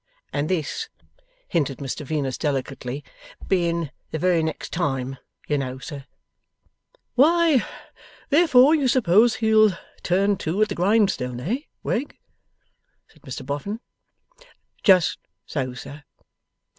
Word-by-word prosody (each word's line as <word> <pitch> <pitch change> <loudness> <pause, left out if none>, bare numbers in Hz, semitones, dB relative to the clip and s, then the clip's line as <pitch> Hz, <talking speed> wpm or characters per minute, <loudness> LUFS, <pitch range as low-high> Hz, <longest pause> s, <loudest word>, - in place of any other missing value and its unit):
And 145 +1 -1
this,' 185 - -2 0.6
hinted 145 -7 0
Mr 140 +1 -5
Venus, 140 -3 -2
delicately, 135 -2 -3 0.4
'being 170 -5 0 0.2
the - - -3
very 175 +1 +2
next 160 0 -4
time, 135 -6 -1 0.3
you 145 -1 +1
know, 130 -1 -4
sir 140 +1 -8 0.5
' - - -41
'Why, 315 -1 +4 0.7
therefore 290 -3 +6
you 290 -4 +2
suppose 230 -2 +4
he'll 215 -4 +4 0.2
turn 195 +3 +2
to 180 +7 0
at 215 - -1
the - - -2
grindstone, 180 - +1
eh, 210 - -1 0.3
Wegg?' 275 +5 -2 0.9
said - - -23
Mr 130 - -7
Boffin. 145 +11 -4 1.0
'Just 185 -4 +4 0.3
so, 130 -4 -3
sir. 140 +4 -9
170 Hz, 120 wpm, -24 LUFS, 140-220 Hz, 1.0 s, therefore